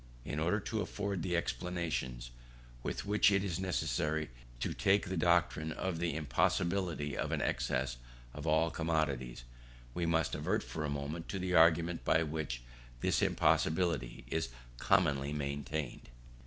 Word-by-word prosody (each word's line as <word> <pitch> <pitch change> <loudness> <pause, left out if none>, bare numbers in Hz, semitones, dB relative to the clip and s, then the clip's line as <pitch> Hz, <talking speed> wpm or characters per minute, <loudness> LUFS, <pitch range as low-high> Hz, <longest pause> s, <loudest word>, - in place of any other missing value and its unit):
In 75 - -3
order 90 +6 +2
to 110 +2 -2
afford 100 -1 -2
the 90 +1 0
explanations, 85 -10 -2 0.5
with - - -3
which 105 0 +4
it 100 0 +3
is 90 -4 -2
necessary 80 -5 -1 0.3
to - - -1
take 100 0 +2
the 95 - -2
doctrine 85 -2 +2
of 90 0 -2
the 85 -3 0
impossibility 80 +1 0
of - - -2
an - - 0
excess 65 -1 0 0.4
of 75 +2 -6
all 80 +1 +3
commodities, 75 -8 -1 0.5
we 85 +2 -1
must 80 -1 +1
advert - - 0
for 80 - -4
a 75 - -1
moment 70 +4 -4
to 95 - -2
the 90 -1 -2
argument 85 0 +5
by 80 - +3
which 75 -6 -3 0.4
this - - +2
impossibility 80 -9 +2
is 80 +2 -1 0.3
commonly 70 0 +2
maintained. 70 -2 -3
80 Hz, 145 wpm, -34 LUFS, 75-90 Hz, 0.5 s, argument